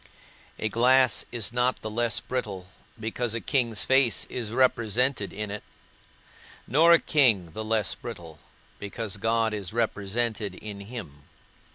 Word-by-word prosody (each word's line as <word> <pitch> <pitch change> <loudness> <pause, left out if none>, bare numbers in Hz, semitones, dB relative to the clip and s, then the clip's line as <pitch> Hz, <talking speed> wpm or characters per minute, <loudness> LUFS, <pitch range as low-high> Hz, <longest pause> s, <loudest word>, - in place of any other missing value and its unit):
A 110 - -1
glass 125 +3 +3
is 120 -1 -2
not 125 +1 0
the 110 - -3
less 120 +1 +1
brittle, 105 -8 -4 0.3
because 115 +1 -2
a - - -1
king's 115 -1 +1
face 130 -3 +3
is 115 -4 -3
represented 120 -2 +2
in 105 0 -5
it; 105 - -5 1.0
nor 160 +7 +5
a 170 - +7
king 110 - +3
the 110 +7 -5
less 110 -4 0
brittle, 80 -2 -9 0.4
because 105 0 -5
God 115 +1 +1
is 100 -2 -5
represented 110 -2 -1
in 105 0 -8
him. 100 - -9
110 Hz, 140 wpm, -26 LUFS, 100-120 Hz, 1.0 s, a